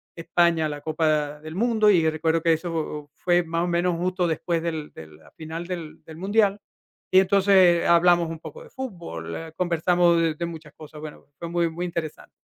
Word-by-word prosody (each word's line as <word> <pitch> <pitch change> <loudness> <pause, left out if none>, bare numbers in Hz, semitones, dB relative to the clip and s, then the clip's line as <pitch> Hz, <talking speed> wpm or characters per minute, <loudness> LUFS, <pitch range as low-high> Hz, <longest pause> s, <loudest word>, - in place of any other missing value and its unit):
España 165 -1 +1
la 145 -1 -5
Copa 155 -2 0
del 155 +1 -8
Mundo, 220 0 +3
y 165 -5 +4
recuerdo 160 +1 0
que 165 0 +3
eso 160 -3 -4
fue 175 0 +2
más 165 0 -2
o - - -3
menos 175 0 0
justo 180 +1 -1
después 165 +1 -1
del 160 -3 -4
de 80 - -11
la 80 0 -19
final 165 +2 -7
del 170 -4 -7
del 160 - -11
mundial, 205 +1 +1 0.5
y 185 - +7
entonces, 195 +1 +3
eh, 175 -3 +5
hablamos 170 0 +4
un 165 -1 -6
poco 485 - -10
de - - -16
fútbol, 170 - -7
eh, 165 -1 -7
conversamos 175 0 +2
de 165 -2 0
de 170 +2 -3
muchas 165 -2 -9
cosas, 155 -1 -12
bueno, 155 -1 -10
fue 170 - -6
muy 170 0 0
muy 170 +2 -4
interesante. 170 -3 -5
170 Hz, 200 wpm, -24 LUFS, 160-180 Hz, 0.5 s, y